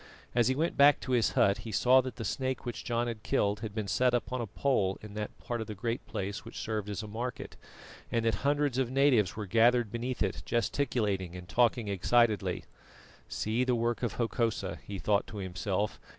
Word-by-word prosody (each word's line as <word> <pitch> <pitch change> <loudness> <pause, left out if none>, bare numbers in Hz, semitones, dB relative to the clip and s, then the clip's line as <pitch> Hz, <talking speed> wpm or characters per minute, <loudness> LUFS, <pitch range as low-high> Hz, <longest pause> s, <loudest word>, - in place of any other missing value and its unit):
As 120 -1 +3
he 130 - +2
went 160 +4 0
back 140 0 +7
to 130 - -5
his 120 -3 +2
hut 100 +2 +3
he 110 +1 -7
saw 125 +7 +5
that 130 -3 -6
the 115 -3 -5
snake 130 +4 -2
which 120 - -5
John 120 0 0
had 115 -3 -4
killed 105 -1 +1
had 110 -2 -6
been 110 -2 -2
set 125 +5 +2
upon 125 +1 -2
a 115 - -3
pole 100 -4 0
in 105 -1 -9
that 105 0 -5
part 120 -1 -4
of 110 - -5
the 105 - -6
Great 115 +4 -3
Place 100 0 -4
which - - -10
served 110 -2 -3
as 105 +1 -4
a - - -6
market, 120 +4 -5 0.6
and 115 -1 0
that 115 - +3
hundreds 145 -2 +1
of 130 -3 +1
natives 125 -9 +3
were 105 -1 -4
gathered 115 +2 +3
beneath 120 +1 -2
it - - -2
gesticulating 110 -7 -1
and 90 -1 -9
talking 120 +1 +2
excitedly. 100 -1 +2 0.6
"See 110 - 0
the 125 -1 +2
work 120 0 0
of 120 -4 -1
Hokosa," 115 -1 -1
he 100 - -6
thought 100 +1 +1
to 105 - -8
himself. 95 +2 -2
115 Hz, 210 wpm, -30 LUFS, 105-125 Hz, 0.6 s, back